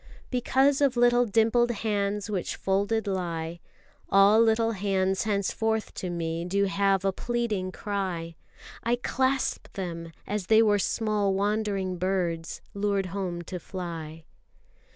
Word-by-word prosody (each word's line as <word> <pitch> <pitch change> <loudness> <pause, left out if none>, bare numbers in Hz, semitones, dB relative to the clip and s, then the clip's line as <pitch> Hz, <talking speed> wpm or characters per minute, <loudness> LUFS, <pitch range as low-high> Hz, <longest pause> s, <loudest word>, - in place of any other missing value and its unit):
Because 270 +3 +2
of 270 -3 +3
little 240 0 +4
dimpled 230 +3 +3
hands 205 -2 -1
Which 200 -4 -2
folded 200 +3 0
lie, 170 -3 -3 0.5
All 200 +3 +6
little 225 0 +3
hands 195 -2 0
henceforth 220 +2 -1
to 185 - -4
me 165 -1 -2
do 195 +3 +1
have 195 -1 +1
A 195 - +3
pleading 220 -5 -2
cry. 185 -5 -3 0.5
I 235 +1 +1
clasp 260 +2 0
them, 170 -3 -5
as 205 -2 -3
they 220 0 +6
were 205 -2 +3
small 210 -2 0
wandering 200 -2 -1
birds, 175 -3 -1
Lured 200 -1 0
home 180 -3 -3
to 180 +2 -6
fly. 165 -3 -7
200 Hz, 130 wpm, -27 LUFS, 185-220 Hz, 0.5 s, All